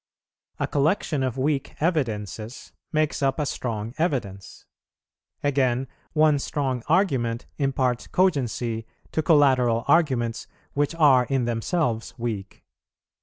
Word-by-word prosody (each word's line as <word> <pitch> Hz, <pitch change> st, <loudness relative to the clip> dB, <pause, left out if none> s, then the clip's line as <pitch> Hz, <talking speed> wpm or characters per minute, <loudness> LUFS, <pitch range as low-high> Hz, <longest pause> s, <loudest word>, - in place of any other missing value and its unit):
A -, -, +1 dB
collection 150 Hz, 0 st, 0 dB
of 130 Hz, -1 st, -1 dB
weak 140 Hz, +1 st, -1 dB
evidences 115 Hz, -, -2 dB, 0.2 s
makes 155 Hz, -2 st, 0 dB
up 135 Hz, -1 st, +1 dB
a 150 Hz, -, +1 dB
strong 115 Hz, -4 st, -3 dB
evidence; 115 Hz, -, -3 dB, 0.8 s
again, 130 Hz, -2 st, +1 dB, 0.3 s
one 155 Hz, -2 st, +4 dB
strong 135 Hz, -3 st, -2 dB
argument 130 Hz, -10 st, +1 dB
imparts 130 Hz, -3 st, 0 dB
cogency 120 Hz, -, 0 dB, 0.2 s
to 160 Hz, -, 0 dB
collateral 130 Hz, -7 st, +4 dB
arguments 130 Hz, -9 st, +2 dB, 0.3 s
which 145 Hz, +3 st, 0 dB
are 140 Hz, -6 st, +5 dB
in 130 Hz, -1 st, 0 dB
themselves 115 Hz, +1 st, -1 dB
weak. 110 Hz, -5 st, -5 dB
130 Hz, 110 wpm, -25 LUFS, 115-150 Hz, 0.8 s, are